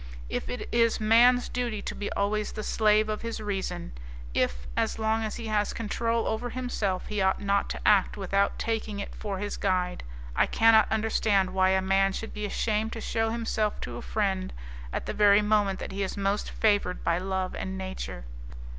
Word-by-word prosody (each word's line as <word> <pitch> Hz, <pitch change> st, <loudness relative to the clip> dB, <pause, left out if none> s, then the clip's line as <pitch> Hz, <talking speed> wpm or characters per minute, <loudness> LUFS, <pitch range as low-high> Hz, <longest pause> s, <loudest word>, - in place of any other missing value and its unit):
If -, -, -3 dB
it 250 Hz, -, -4 dB
is 230 Hz, -1 st, +3 dB
man's 240 Hz, +3 st, +5 dB
duty 240 Hz, -4 st, -3 dB
to -, -, -4 dB
be 205 Hz, -, -4 dB
always 210 Hz, +1 st, -1 dB
the 215 Hz, -, -5 dB
slave 215 Hz, 0 st, +3 dB
of 215 Hz, 0 st, -3 dB
his 230 Hz, -1 st, -4 dB
reason; 200 Hz, -, -3 dB, 0.4 s
if, 65 Hz, +1 st, 0 dB
as -, -, 0 dB
long 220 Hz, 0 st, 0 dB
as 215 Hz, -, -3 dB
he 235 Hz, -, -6 dB
has 210 Hz, -1 st, 0 dB
control 230 Hz, +1 st, -1 dB
over 220 Hz, +3 st, -2 dB
himself, 225 Hz, -7 st, -2 dB
he 210 Hz, -2 st, -2 dB
ought 190 Hz, 0 st, +2 dB
not 200 Hz, 0 st, +1 dB
to -, -, -4 dB
act 205 Hz, -2 st, +4 dB
without 200 Hz, 0 st, +1 dB
taking 220 Hz, -2 st, -2 dB
it 200 Hz, -, -5 dB
for 200 Hz, -2 st, -4 dB
his 205 Hz, +1 st, -4 dB
guide, 180 Hz, -2 st, 0 dB, 0.3 s
I -, -, +3 dB
cannot 225 Hz, -1 st, +5 dB
understand 215 Hz, -3 st, +2 dB
why 190 Hz, 0 st, +3 dB
a 190 Hz, 0 st, +2 dB
man 195 Hz, 0 st, +2 dB
should 220 Hz, -, -5 dB
be 210 Hz, 0 st, -4 dB
ashamed 220 Hz, +1 st, -1 dB
to 230 Hz, -, -5 dB
shew 225 Hz, 0 st, 0 dB
himself 225 Hz, -2 st, -1 dB
to -, -, -5 dB
a -, -, -6 dB
friend 190 Hz, -3 st, -1 dB, 0.4 s
at -, -, -3 dB
the -, -, -3 dB
very 205 Hz, 0 st, +5 dB
moment 210 Hz, -2 st, +2 dB
that -, -, -6 dB
he 195 Hz, +1 st, -4 dB
is 195 Hz, +1 st, -3 dB
most 200 Hz, +1 st, 0 dB
favoured 205 Hz, -4 st, +1 dB
by 170 Hz, +1 st, +1 dB
love 190 Hz, 0 st, -2 dB
and 190 Hz, 0 st, -4 dB
nature. 190 Hz, -, -6 dB
210 Hz, 195 wpm, -28 LUFS, 195-220 Hz, 0.4 s, man's